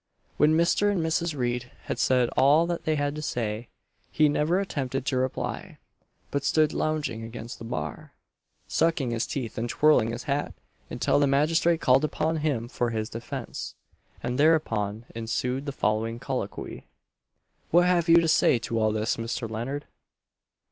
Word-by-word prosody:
When 155 +1 +4
Mr. 185 +5 +3
and 200 - 0
Mrs. 160 -1 -1
Reid 120 -1 -2
had - - -4
said 125 -2 +3
all 150 +5 +4
that 170 0 -3
they 155 - +2
had 145 -1 -1
to 155 - -5
say, 115 -5 -3 0.4
he 155 -1 +4
never 155 +5 +1
attempted 135 -9 -3
to 130 - 0
reply; 130 0 -3 0.5
but 140 -1 -1
stood 155 +1 +2
lounging 155 -7 -1
against 115 +1 -8
the 115 - -8
bar, 75 -10 -5 0.6
sucking 160 -6 +1
his 115 0 -1
teeth 120 -6 -4
and 120 +1 -2
twirling 145 -7 +4
his 120 +1 -5
hat, 145 0 -2 0.3
until - - +1
the 145 - +3
magistrate 160 +4 +2
called 130 +3 +4
upon 160 +1 0
him 145 -7 -1
for 120 -1 -1
his 110 -1 -3
defence, 120 +2 -6 0.5
and 125 +2 -2
thereupon 115 -9 +2
ensued 125 +4 -2
the - - -1
following 115 -3 -1
colloquy: 125 -5 -5 0.8
"What 175 +2 +5
have 175 -2 +2
you 165 - +8
to 165 - 0
say 155 -5 +4
to 115 0 -2
all 110 -1 +2
this, 110 +2 -1
Mr. 115 0 -3
Leonard?" 120 +7 -4
135 Hz, 160 wpm, -26 LUFS, 115-155 Hz, 0.8 s, you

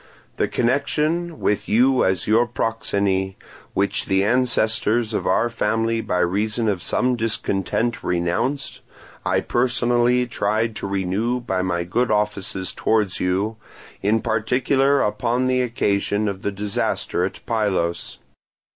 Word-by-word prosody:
The - - +1
connection, 155 +7 0
with 105 0 0
you 125 +3 +4
as 95 -2 +1
your 115 +3 +3
proxeni, 100 -5 -1 0.4
which 100 +1 0
the 95 0 +2
ancestors 115 -1 +2
of - - -1
our 120 - +3
family 115 -1 0
by 90 -4 -1
reason 105 +6 0
of 100 -4 0
some 125 +6 +1
discontent 115 0 -1
renounced, 90 +11 -1 0.4
I - - +1
personally 120 0 +2
tried 110 -1 -1
to - - -4
renew 100 +6 -1
by 95 -6 -2
my 90 -2 -1
good 120 +8 0
offices 105 -3 -1
towards 105 -4 +1
you, 100 +5 0 0.4
in 105 +3 +2
particular 130 +5 +2
upon 115 +4 0
the 130 0 +2
occasion 105 -3 0
of 100 -1 -3
the 100 - -1
disaster 100 -3 -2
at 95 - -3
Pylos. 100 -7 -1
110 Hz, 130 wpm, -22 LUFS, 100-120 Hz, 0.4 s, you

